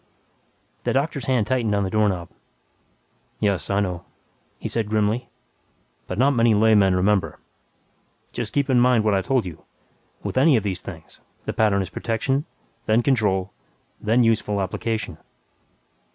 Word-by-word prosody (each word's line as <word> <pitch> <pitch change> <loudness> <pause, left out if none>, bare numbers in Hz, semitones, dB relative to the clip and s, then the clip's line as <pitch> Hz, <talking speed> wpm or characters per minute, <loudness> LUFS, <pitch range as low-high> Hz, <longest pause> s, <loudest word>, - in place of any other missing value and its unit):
The - - 0
doctor's 140 -2 -1
hand 125 -5 +2
tightened 115 -4 0
on 100 - +1
the 95 - -3
doorknob. 100 -5 0 1.1
"Yes, 100 -3 0
I 100 0 +2
know," 90 -4 -3 0.5
he - - -5
said 110 -3 -2
grimly, 110 +3 0 0.8
"but 90 - -4
not 135 +4 +4
many 115 -4 +3
laymen 105 -3 +4
remember. 95 +1 +1 0.9
Just - - -4
keep 140 -1 0
in 130 -3 +3
mind 125 -2 +4
what 105 -1 +2
I 95 - +2
told 130 +2 0
you. 85 -3 -9 0.6
With - - -1
any 140 -1 +5
of 110 - -1
these 95 -3 -3
things, - - -11 0.3
the - - -3
pattern 100 -3 +2
is 95 - -9
protection, 135 +6 -1 0.4
then 110 +2 +3
control, 100 -8 +1 0.5
then 115 +3 +3
useful 110 -3 +1
application." 110 +3 -3
110 Hz, 150 wpm, -23 LUFS, 100-120 Hz, 1.1 s, any